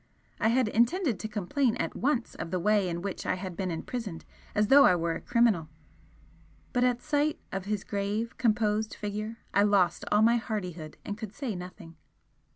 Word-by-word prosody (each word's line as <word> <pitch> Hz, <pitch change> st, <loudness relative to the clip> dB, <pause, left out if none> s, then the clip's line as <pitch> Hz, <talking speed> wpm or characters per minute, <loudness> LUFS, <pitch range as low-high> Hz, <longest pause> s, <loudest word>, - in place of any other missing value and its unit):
I -, -, +2 dB
had 240 Hz, +1 st, +3 dB
intended 235 Hz, -, +2 dB
to 215 Hz, -, -3 dB
complain 225 Hz, +5 st, 0 dB
at -, -, -2 dB
once 260 Hz, -3 st, 0 dB
of -, -, -6 dB
the 185 Hz, -, -1 dB
way 205 Hz, 0 st, +2 dB
in 170 Hz, +1 st, -4 dB
which 200 Hz, -2 st, -4 dB
I -, -, 0 dB
had 185 Hz, -1 st, -6 dB
been 185 Hz, +1 st, -2 dB
imprisoned 180 Hz, +2 st, -5 dB, 0.3 s
as 210 Hz, 0 st, +2 dB
though 280 Hz, +1 st, +8 dB
I 180 Hz, -, +6 dB
were 170 Hz, -1 st, 0 dB
a -, -, -5 dB
criminal 225 Hz, -10 st, +2 dB, 1.0 s
but 245 Hz, -1 st, +2 dB
at 245 Hz, -1 st, +1 dB
sight 300 Hz, 0 st, +1 dB
of 195 Hz, 0 st, -4 dB
his 210 Hz, -1 st, -2 dB
grave, 205 Hz, +3 st, -2 dB
composed 215 Hz, -2 st, +1 dB
figure 210 Hz, +2 st, -4 dB, 0.2 s
I 200 Hz, -, +4 dB
lost 200 Hz, -4 st, +3 dB
all 210 Hz, +1 st, +5 dB
my 235 Hz, +1 st, +5 dB
hardihood 180 Hz, -9 st, -5 dB
and 205 Hz, +1 st, -5 dB
could 220 Hz, -3 st, -7 dB
say 265 Hz, -6 st, -3 dB
nothing. 180 Hz, -3 st, -9 dB
210 Hz, 185 wpm, -29 LUFS, 185-235 Hz, 1.0 s, though